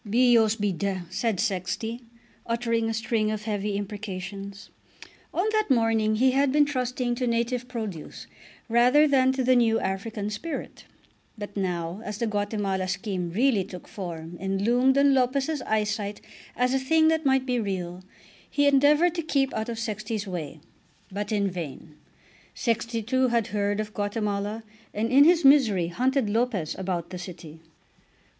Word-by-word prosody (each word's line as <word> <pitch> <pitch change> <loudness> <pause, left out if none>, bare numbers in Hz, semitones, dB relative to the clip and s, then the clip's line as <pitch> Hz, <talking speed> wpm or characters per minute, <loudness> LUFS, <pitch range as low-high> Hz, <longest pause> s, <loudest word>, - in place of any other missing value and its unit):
"Bios 225 0 +4
be 205 -2 0
d 190 +1 -2
," - - -22
said 215 +2 -1
Sexty, 200 +5 -2 0.5
uttering 230 -1 0
a - - -1
string 220 -1 0
of 215 -1 -3
heavy 210 -1 -2
imprecations. 200 -1 -6 0.6
On 365 +5 0
that 430 -3 +1
morning 225 -3 +2
he 260 +4 +4
had 275 +1 +2
been 295 +1 +4
trusting 250 -3 -1
to 245 +1 -2
native 235 +1 -1
produce 220 -10 -6 0.4
rather 250 +6 +5
than 260 -2 +4
to 260 -1 -1
the 255 +1 +4
new 225 -2 +3
African 205 +2 -3
spirit. 305 +10 -6 0.5
But 205 -1 -7
now 180 -1 -2
as 210 -1 -5
the 235 - -1
Guatemala 205 -3 -1
scheme 190 -2 -3
really 220 +2 +2
took 180 -1 -10
form 175 -5 -7
and 195 +1 -2
loomed 250 +4 +3
on 280 0 +5
Lopez's 270 +3 +1
eyesight 210 -1 -1 0.4
as 250 +1 +1
a 270 - +2
thing 315 +4 +3
that 320 0 +1
might 265 -2 +2
be 250 -2 0
real, 185 -4 -4 0.5
he 285 - +1
endeavoured 290 +4 +4
to 345 - -2
keep 275 -4 0
out 220 +1 -3
of 230 - -4
Sexty's 215 -1 -3
way. 160 -5 -6 0.5
But 205 +2 -4
in 205 -2 +1
vain; 165 -4 -6 0.6
Sexty 230 -1 -1
too 260 +2 +2
had 235 -2 +1
heard 205 0 0
of 215 0 -4
Guatemala, 205 +1 -2 0.3
and 225 +3 -1
in 280 +3 +7
his 340 -2 +4
misery 225 -12 +5
hunted 255 +5 +1
Lopez 215 -6 0
about 180 -2 -3
the 180 - -6
city. 165 -3 -9
220 Hz, 160 wpm, -26 LUFS, 200-255 Hz, 0.6 s, in